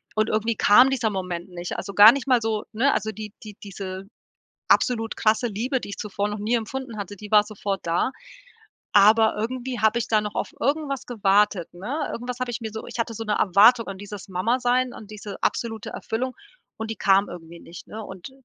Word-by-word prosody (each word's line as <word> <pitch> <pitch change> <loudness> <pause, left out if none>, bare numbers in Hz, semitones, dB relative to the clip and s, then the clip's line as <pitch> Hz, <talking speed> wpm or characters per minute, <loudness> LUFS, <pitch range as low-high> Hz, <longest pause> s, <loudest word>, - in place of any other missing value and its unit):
Und 215 0 +1
irgendwie 220 +1 0
kam 245 +6 +6
dieser 235 -5 0
Moment 180 -2 -4
nicht. 175 0 -6
Also, 200 - -6
gar 210 +3 +10
nicht 270 0 -4
mal 250 -3 +4
so, 220 -1 -1
ne 265 +6 +3
also 220 - -1
die 215 0 -8
die 210 -2 -10
diese 190 -1 -7 0.6
absolut 225 -4 +2
krasse 220 +3 +2
Liebe, 245 +6 -2
die - - -8
ich 200 - -7
zuvor 205 0 -2
noch 210 0 -4
nie 215 +4 0
empfunden 235 0 -4
hatte, 205 0 -6
die 210 +1 -11
war 210 -1 +7
sofort 200 -2 -4
da, 175 +10 +1 0.8
aber 215 +2 +5
irgendwie 250 +3 -3
habe 220 +2 +3
ich - - -4
da 215 -1 +3
noch 210 0 -5
auf - - -3
irgendwas 280 0 -1
gewartet, 205 -5 +1
ne` 240 - -4
Irgendwas 245 +1 -5
habe 255 -1 -2
ich 240 - -4
mir 220 - -4
so 220 - -7
ich - - -8
hatte 230 0 -1
so 225 +1 -5
'ne 210 -1 0
Erwartung 215 +6 +5
an 195 -1 -6
dieses 205 0 -9
Mama-Sein, 245 +6 +1
an 215 - -10
diese 210 -1 -8
absolute 225 -2 -2
Erfüllung, 255 +3 -4 0.4
und 220 0 -4
die 225 - -4
kam 195 +1 +3
irgendwie 170 -1 -10
nicht, 170 - -12
ne? 220 +1 -7
Und 190 +3 -9
215 Hz, 210 wpm, -24 LUFS, 200-240 Hz, 0.8 s, gar